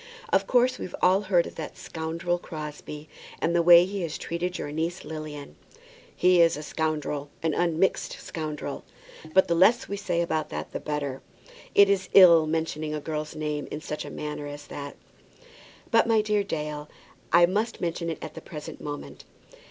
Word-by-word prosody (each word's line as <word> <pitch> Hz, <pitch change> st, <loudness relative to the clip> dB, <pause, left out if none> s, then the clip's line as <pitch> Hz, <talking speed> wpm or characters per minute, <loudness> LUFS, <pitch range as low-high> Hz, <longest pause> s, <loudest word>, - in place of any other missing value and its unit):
Of -, -, +3 dB
course 250 Hz, +1 st, +3 dB
we've 180 Hz, -, -5 dB
all 185 Hz, +2 st, +4 dB
heard 185 Hz, -4 st, +2 dB
of -, -, -8 dB
that 160 Hz, -, -6 dB
scoundrel 170 Hz, +2 st, -3 dB
Crosbie, 150 Hz, -1 st, -8 dB, 0.3 s
and 170 Hz, +1 st, 0 dB
the 170 Hz, -, +4 dB
way 170 Hz, +1 st, +8 dB
he 195 Hz, +1 st, -4 dB
has 165 Hz, -3 st, -3 dB
treated 180 Hz, +2 st, -3 dB
your 145 Hz, -, -5 dB
niece 165 Hz, +4 st, -3 dB
Lilian." 155 Hz, -2 st, -7 dB, 0.6 s
"He 180 Hz, -1 st, +5 dB
is 165 Hz, -2 st, +4 dB
a 150 Hz, -, -6 dB
scoundrel, 150 Hz, -2 st, -2 dB
an 160 Hz, -2 st, +1 dB
unmixed 175 Hz, +3 st, +1 dB
scoundrel. 150 Hz, -3 st, -5 dB, 0.5 s
But 190 Hz, +3 st, +5 dB
the 170 Hz, -, +2 dB
less 190 Hz, +8 st, +4 dB
we 200 Hz, -, -4 dB
say 185 Hz, -4 st, -1 dB
about 160 Hz, -2 st, -2 dB
that 75 Hz, +1 st, -5 dB
the -, -, -4 dB
better. 145 Hz, -3 st, -3 dB, 0.5 s
It 200 Hz, -, +8 dB
is 195 Hz, -1 st, +1 dB
ill 170 Hz, -4 st, +8 dB
mentioning 155 Hz, -1 st, -2 dB
a -, -, -2 dB
girl's 155 Hz, 0 st, -4 dB
name 150 Hz, -1 st, -3 dB
in 150 Hz, -, -5 dB
such 150 Hz, 0 st, -5 dB
a -, -, -7 dB
matter 150 Hz, -1 st, -5 dB
as 145 Hz, 0 st, -8 dB
that." 140 Hz, 0 st, -7 dB, 1.0 s
"But, 230 Hz, -1 st, +4 dB
my 225 Hz, -2 st, +4 dB
dear 210 Hz, -1 st, +1 dB
Dale, 150 Hz, -4 st, -4 dB, 0.4 s
I 170 Hz, +1 st, +7 dB
must 210 Hz, +6 st, -1 dB
mention 170 Hz, -1 st, -2 dB
it 160 Hz, -, -3 dB
at 155 Hz, -1 st, -7 dB
the -, -, -9 dB
present 150 Hz, -2 st, -9 dB
moment. 145 Hz, -1 st, -7 dB
160 Hz, 180 wpm, -26 LUFS, 150-180 Hz, 1.0 s, way